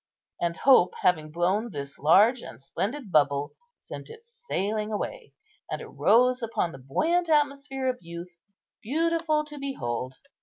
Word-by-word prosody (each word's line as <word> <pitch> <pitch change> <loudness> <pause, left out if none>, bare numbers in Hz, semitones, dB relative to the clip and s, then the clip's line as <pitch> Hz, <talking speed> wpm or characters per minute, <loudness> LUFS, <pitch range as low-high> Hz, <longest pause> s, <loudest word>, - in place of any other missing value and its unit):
And 170 -1 -1
hope 260 -10 +5
having 155 -4 +2
blown 185 +8 0
this 140 -6 -7
large 210 - +5
and - - -10
splendid 205 - -4
bubble, 145 -2 +2 0.2
sent - - -10
it 455 0 -13
sailing 220 - -3
away, 465 - -5 0.4
and - - -3
it - - -8
rose 250 +2 +3
upon 225 -7 -1
the 135 - -11
buoyant 335 - +1
atmosphere 280 -3 +1
of 250 -1 -1
youth, 170 +1 -9 0.4
beautiful 315 +3 0
to 295 -1 -10
behold. 130 - -4
225 Hz, 145 wpm, -27 LUFS, -, 0.4 s, hope